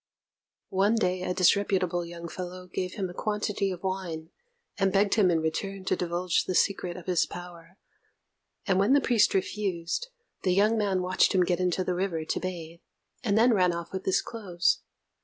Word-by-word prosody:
One 200 +4 +2
day 185 -4 0
a 180 - -2
disreputable 185 -2 +2
young 170 0 -8
fellow 180 +1 -7
gave 180 0 -4
him 195 -2 -2
a 175 - -9
quantity 210 0 -1
of 180 -1 -6
wine, 175 -4 -4 0.5
and 195 -1 +3
begged 200 +1 +3
him 205 -5 +4
in 165 -2 +2
return 190 +4 -3
to - - +2
divulge 175 0 0
the 185 - -2
secret 180 -2 +1
of 180 - -10
his 180 -2 +2
power; 175 0 -10 0.9
and 190 -3 +2
when 205 +7 +4
the 285 - +6
priest 230 -6 +3
refused, 190 - -2 0.3
the 180 -1 +1
young 210 +3 +4
man 195 -4 0
watched 185 +1 +3
him 185 - +5
get 175 0 0
into 180 0 +1
the 180 - -1
river 175 -3 -2
to - - -1
bathe, 170 -2 -6 0.4
and 210 -3 +1
then 235 +2 +5
ran 180 -4 +3
off 170 +1 -6
with 190 - -4
his 190 - +2
clothes. 185 -6 0
185 Hz, 185 wpm, -28 LUFS, 175-195 Hz, 0.9 s, the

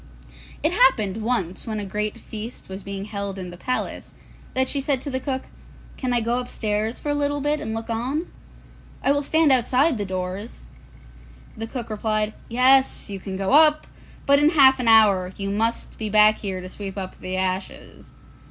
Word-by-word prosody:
It 310 - +2
happened 225 - +3
once 215 -6 -2
when 215 -1 -3
a 205 - -4
great 210 +2 -3
feast 220 0 -8
was 190 +1 -7
being 195 0 -6
held 200 -2 -5
in 180 -2 -6
the - - -9
palace, 255 +8 -4 0.4
that 260 0 +2
she 280 - -1
said 275 -1 0
to 285 - -5
the 260 - -1
cook, 265 0 -3 0.5
'Can 255 -2 -3
I 240 -1 +2
go 235 +2 0
upstairs 220 -2 -2
for 295 - -5
a - - +2
little 290 0 0
bit 295 +2 0
and 220 +1 -4
look 225 0 -5
on? 250 +8 -2 0.8
I - - +3
will 285 0 +2
stand 315 +1 +3
outside 260 +2 +3
the - - -1
doors.' 185 - -5 0.9
The 225 +1 -5
cook 235 -2 -6
replied, 215 0 -1 0.2
'Yes, 255 -1 +3
you 195 - -5
can 190 0 -6
go 195 0 -1
up, 305 0 +5 0.4
but 280 0 +5
in 295 +1 +5
half 265 -5 +6
an 245 - -2
hour 200 -5 +5
you 195 0 -3
must 225 +3 -2
be 215 -1 -3
back 215 +1 +5
here 190 -3 -4
to 185 - -8
sweep 195 +1 -7
up 190 -1 -6
the 185 0 -4
ashes. 185 0 -4
225 Hz, 190 wpm, -23 LUFS, 200-265 Hz, 0.9 s, half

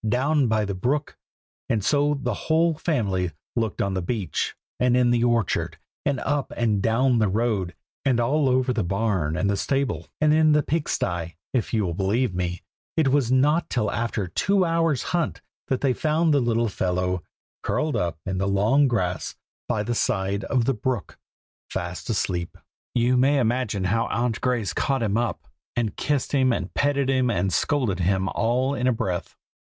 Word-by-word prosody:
down 135 +4 +2
by 110 -1 +1
the 100 - -3
brook!" 135 +10 -1 0.5
and 110 -4 0
so 145 0 +2
the 120 - 0 0.2
whole 165 +1 +4
family 105 - -1 0.3
looked 115 -4 0
on 100 -1 -1
the 95 - -1
beach, 100 +1 -2 0.2
and 125 0 +3
in 125 -1 +4
the 120 -1 +2
orchard, 120 -5 0 0.3
and 140 -3 0
up 145 -1 -1
and 110 -4 +1
down 120 +3 +2
the 110 - +3
road, 100 -3 0 0.3
and 130 -4 +2
all 140 +4 +2
over 130 0 +2
the 115 - 0
barn 95 -4 0
and 100 - +1
the 100 - +1
stable, 125 - -1
and 150 0 +4
in 155 -1 +5
the 150 0 +3
pig 155 +2 -1
sty. 85 -1 -2 0.2
If 125 -5 0
you 110 -3 +1
will 85 - -2
believe 100 +6 0
me, 90 -1 -3 0.3
it 155 -4 +3
was 135 -3 +2
not 150 +6 +3
till 105 -5 0
after 110 -1 -1
a 90 - -6
two 195 - +2
hour's 165 -4 +1
hunt 170 -3 -2 0.2
that 130 - -1
they 135 -3 +2
found 155 +3 +1
the 145 - +4
little 120 -1 +1
fellow, 90 -2 -1 0.4
curled 155 -1 -1
up 85 -3 -1
in 95 -1 -2
the 100 - 0
long 110 +9 +3
grass 90 - -1 0.3
by 105 - 0
the 120 +3 -2
side 100 -4 0
of 125 -4 +1
the 135 - +2
brook, 120 -1 -3 0.5
fast 90 +1 -5
asleep. 90 -5 -2 0.4
You 125 +1 +3
may 135 +3 +4
imagine 120 -5 0
how 115 +5 +1
Aunt 120 -1 -1
Grace 125 -6 0
caught 135 -3 0
him 105 -2 0
up, 120 0 -2 0.3
and 115 -4 -1
kissed 145 -2 -1
and 130 -9 +1
petted 140 -1 +1
and 120 -9 +1
scolded 125 -11 +1
him 95 +2 +1
all 125 +4 +1
in 125 -2 0
a - - +4
breath. 90 -5 -3
120 Hz, 180 wpm, -24 LUFS, 100-135 Hz, 0.5 s, in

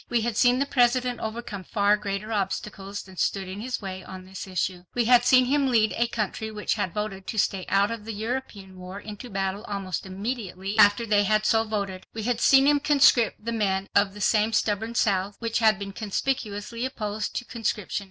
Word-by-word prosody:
We 240 -1 +1
had 230 0 -2
seen 245 +2 +4
the 275 - +1
President 250 -2 +2
overcome 220 -3 -5
far 205 +2 +2
greater 210 +1 -4
obstacles 200 0 -3
than 190 -1 -15
stood 195 +1 0
in 190 +2 -6
his 245 -2 -4
way 190 -1 -6
on 185 -1 -10
this 190 +1 -8
issue. 185 -1 -2
We 240 -1 +2
had 245 +1 +6
seen 255 0 +6
him 280 +2 +2
lead 225 -4 +3
a 235 - +1
country 220 -1 -3
which 210 -1 -2
had 200 -5 -2
voted 205 -2 -4
to 220 - -4
stay 190 -2 0
out 200 +2 +3
of 225 -2 -6
the 225 - -4
European 210 -4 -5
war 185 +2 -8
into 210 +4 -9
battle 195 0 -2
almost 195 -2 -4
immediately 195 -1 -4
after 205 +3 +6
they 205 -2 +3
had 215 +1 +2
so 225 +1 +3
voted. 200 -4 -4
We 220 - -4
had 235 0 -1
seen 270 0 +6
him 290 0 +4
conscript 275 -7 +3
the 235 - -1
men 195 -3 -1
of 200 -1 +2
the 205 - -8
same 215 +2 +2
stubborn 220 +2 0
South, 200 -3 +1
which 230 0 -1
had 220 -3 +4
been 200 0 -6
conspicuously 215 +1 -3
opposed 215 -4 -3
to 245 - -3
conscription. 220 -5 -2
210 Hz, 205 wpm, -26 LUFS, 195-235 Hz, -, had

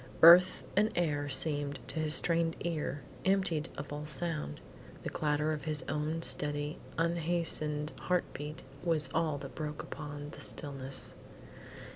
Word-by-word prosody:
Earth 175 +2 +8
and 210 +2 +4
air 145 -4 0
seemed, 145 0 0
to 160 - -3
his 155 -1 +4
strained 165 -1 +3
ear, 155 -4 -3 0.2
emptied 190 -5 +1
of 145 +1 -6
all 150 +1 -5
sound. 150 - -2 0.4
The - - -4
clatter 150 0 0
of 150 -3 -6
his 155 -2 -2
own 155 +3 -2
steady, 145 0 +4 0.2
unhastened 165 -3 0
heart 180 -1 +1
beat 150 +1 -7 0.2
was 165 -3 +1
all 160 -3 0
that 135 -1 -9
broke 150 -1 -5
upon 145 -1 -7
the - - -11
stillness. 135 -2 -1
150 Hz, 140 wpm, -32 LUFS, 145-165 Hz, 0.4 s, Earth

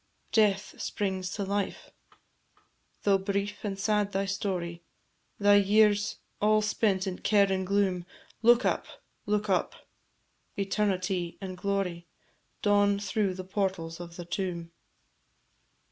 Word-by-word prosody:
Death 210 -2 +2
springs 190 -2 -2
to 205 - -2
life: 200 0 -3 1.1
Though 200 -1 +4
brief 200 +1 -2
and 200 -2 -3
sad 210 0 +1
thy 195 +1 0
story, 185 -4 -3 0.6
Thy 205 0 +6
years 205 0 +3 0.2
all 215 0 +4
spent 210 -2 +1
in 185 -2 -4
care 205 -2 +4
and 190 -1 -2
gloom, 190 -3 +1 0.3
Look 240 +1 +5
up, - - 0 0.4
look 210 0 +1
up; 190 -2 +1 0.8
Eternity 190 -3 -1
and 190 -2 -6
glory 180 -3 -2 0.6
Dawn 205 -1 +4
through 200 -1 -1
the 185 - -6
portals 185 -4 -2
of 170 -1 -8
the 175 - -7
tomb. 175 -2 -3
195 Hz, 120 wpm, -29 LUFS, 185-205 Hz, 1.1 s, Thy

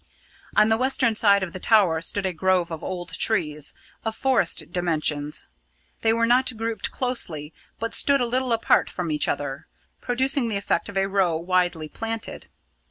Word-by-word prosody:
On 215 - +5
the 220 - +3
western 255 -2 +2
side 200 -2 +4
of 175 - -5
the 185 - -6
tower 185 -7 +3
stood 195 +4 -3
a 185 - -1
grove 180 0 +1
of 160 - -6
old 180 -1 -5
trees, 150 -9 -1 0.3
of 225 -1 -3
forest 255 -10 +1
dimensions. 155 -4 -1 0.6
They 225 - +3
were 230 +1 +2
not 250 0 +2
grouped 225 0 -3
closely, 165 - 0 0.3
but 230 0 -3
stood 280 -1 +4
a 245 - +1
little 255 +1 -1
apart 230 0 +2
from 175 -3 -4
each 150 -1 0
other, 140 -1 -3 0.3
producing 260 +1 +1
the 215 -3 -1
effect 200 - -1
of 200 - -6
a 195 - +2
row 190 -4 +1
widely 175 -2 0
planted. 225 +7 -5
195 Hz, 170 wpm, -24 LUFS, 170-230 Hz, 0.6 s, On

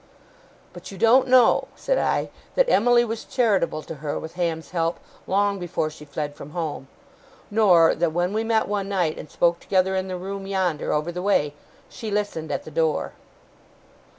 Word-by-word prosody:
'But - - -10
you 195 - -9
don't 230 +6 +5
know,' 255 -2 +5
said - - 0
I, - - 0 0.2
'that - - +4
Emily 240 +2 +4
was 225 -1 -4
charitable 200 - 0
to - - -7
her, 150 -2 -3
with 160 - -7
Ham's 170 -2 -3
help, 165 -1 -1 0.3
long 200 +1 +1
before 175 -3 -2
she 150 -1 -12
fled 145 0 -4
from 145 +1 -11
home. 155 -5 -4 0.6
Nor, 185 -7 +5
that, 170 0 0
when 175 +4 0
we 220 +1 0
met 225 -1 +1
one 200 -1 -2
night, 180 -6 0
and 150 - -9
spoke 170 0 +1
together 190 0 +1
in 190 0 -1
the 185 -1 -4
room 195 +1 -6
yonder, 185 -5 -1
over 150 +3 0
the 180 +1 -5
way, 165 -7 +1 0.3
she 225 -3 -7
listened 205 -6 -2
at - - -2
the 155 - -10
door. 160 0 0
185 Hz, 180 wpm, -24 LUFS, 160-205 Hz, 0.6 s, don't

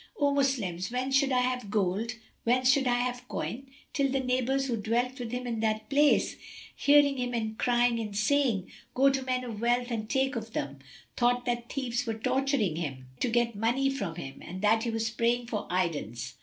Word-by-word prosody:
O 285 -1 +3
Moslems, 230 -11 0
whence 255 +2 0
should 275 0 +3
I 250 -1 +3
have 250 -4 -1
gold, 210 +3 0 0.3
whence 255 +2 +4
should 270 0 +2
I 245 0 +3
have 245 0 -3
coin?" 265 +3 -4 0.2
till 280 -2 +2
the 270 - +1
neighbours, 260 +1 0
who 250 -3 -1
dwelt 240 +4 -1
with 235 -2 -5
him 250 0 -3
in 235 -2 -2
that 215 +1 -1
place, 290 +1 +3 0.4
hearing 285 -1 +5
him 240 -3 -2
crying 240 -1 +2
and 210 -3 -4
saying, 225 -4 +1 0.2
"Go 275 +2 +5
to 270 0 -1
men 255 -1 -1
of 225 -4 -6
wealth 245 +1 +1
and 215 -2 -3
take 265 0 +1
of 225 -1 -5
them," 140 0 -3 0.4
thought 245 0 +2
that 240 -1 -2
thieves 250 -3 -2
were 225 - -1
torturing 255 - 0
him, 135 -6 -5
to 250 - +1
get 235 0 +1
money 240 +6 +1
from 200 -11 -3
him, 135 -2 -8
and 185 +3 -8
that 220 +2 +4
he - - 0
was 225 0 -1
praying 235 +2 +1
for 220 -3 -4
aidance. 145 - -2
240 Hz, 195 wpm, -29 LUFS, 220-260 Hz, 0.4 s, hearing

